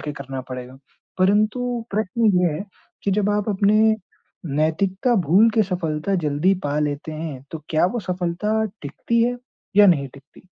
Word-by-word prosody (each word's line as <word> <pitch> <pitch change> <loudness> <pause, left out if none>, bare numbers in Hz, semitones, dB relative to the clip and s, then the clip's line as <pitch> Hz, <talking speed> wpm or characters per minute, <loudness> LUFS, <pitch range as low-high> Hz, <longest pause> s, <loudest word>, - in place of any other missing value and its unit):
के 150 - -5
करना 135 -2 -6
पड़ेगा, 130 +1 -8 0.4
परंतु 215 +5 +1
प्रश्न 215 +2 0
ये 175 -4 +2
है 195 - -5 0.4
कि 200 - 0
जब 205 +1 +1
आप 210 +1 0
अपने 205 +1 +2 0.8
नैतिकता 185 - +1
भूल 205 +7 +6
के 220 - +4
सफलता 175 -1 -2
जल्दी 150 +7 +2
पा 145 +1 0
लेते 150 +1 -2
हैं, 155 -4 -6
तो 160 - -5
क्या 160 +2 +3
वो 235 +6 -2
सफलता 185 +4 -1 0.2
टिकती 230 +11 -1
है 245 +1 +1 0.4
या 205 - +8
नहीं 145 -7 +3
टिकती? 140 +4 -17
185 Hz, 160 wpm, -22 LUFS, 150-210 Hz, 0.8 s, या